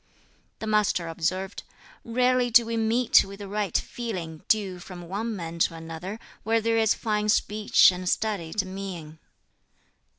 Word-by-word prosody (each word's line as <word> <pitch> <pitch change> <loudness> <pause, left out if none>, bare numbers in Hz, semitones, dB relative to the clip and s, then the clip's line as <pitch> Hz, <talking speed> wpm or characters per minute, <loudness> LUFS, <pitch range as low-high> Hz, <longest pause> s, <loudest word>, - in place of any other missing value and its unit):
The - - -6
Master 210 -5 +1
observed, 185 +4 -2 0.4
"Rarely 250 +1 +2
do 235 0 +6
we 230 0 -3
meet 225 +2 +4
with 195 0 -10
the 200 -1 -8
right 205 -2 0
feeling 180 -10 -5
due 195 -4 +1
from 175 -1 -10
one 215 +5 -3
man 170 -2 -6
to 165 - +2
another 165 +6 -7 0.2
where 225 +2 +2
there 225 +1 +1
is 220 -1 +3
fine 210 -2 -1
speech 210 -2 +4
and 180 0 -3
studied 200 -3 -1
mien." 185 -5 -7
200 Hz, 145 wpm, -26 LUFS, 175-225 Hz, 0.4 s, do